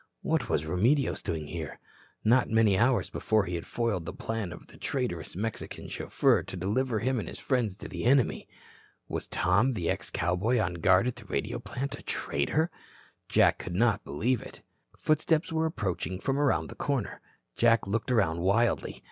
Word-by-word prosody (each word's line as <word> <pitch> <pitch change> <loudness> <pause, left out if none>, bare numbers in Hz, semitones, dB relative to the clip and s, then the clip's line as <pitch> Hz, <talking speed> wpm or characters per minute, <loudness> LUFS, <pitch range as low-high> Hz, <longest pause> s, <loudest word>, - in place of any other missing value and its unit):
What - - 0
was 75 - +1
Remedios 115 - +2
doing 80 -5 -3
here? 80 -1 -6 0.5
Not 120 +3 +4
many 110 -3 +4
hours 120 +5 +2
before 110 -2 +1
he 90 - -4
had 85 -1 -4
foiled 105 -8 -1
the - - -2
plan 110 -5 -3
of 85 - -10
the - - -16
traitorous 105 - -3
Mexican 110 +4 -4
chauffeur - - +2
to 95 - -8
deliver 110 +7 0
him 125 +3 0
and - - -5
his - - -7
friends 120 -8 0
to - - -8
the - - -5
enemy. 130 -1 +3 0.6
Was - - -3
Tom, 100 +9 +2
the 85 -7 0
ex - - -1
cowboy, 90 +9 +1
on 90 -5 0
guard 90 +4 +4
at 125 -1 -2
the 115 - -11
radio 70 -8 -2
plant, 140 +2 -5
a - - -11
traitor? 150 - 0 0.6
Jack - - +4
could 85 - -5
not 115 0 +2
believe 125 +1 0
it. - - -11 0.3
Footsteps 155 +3 +1
were 160 0 +2
approaching 95 - -3
from 135 +6 -1
around 145 -2 +2
the - - -9
corner. 135 -7 -2 0.3
Jack 115 -2 +4
looked 110 +5 -2
around 100 -9 +2
wildly. 105 +7 +1
110 Hz, 180 wpm, -29 LUFS, 90-125 Hz, 0.6 s, Not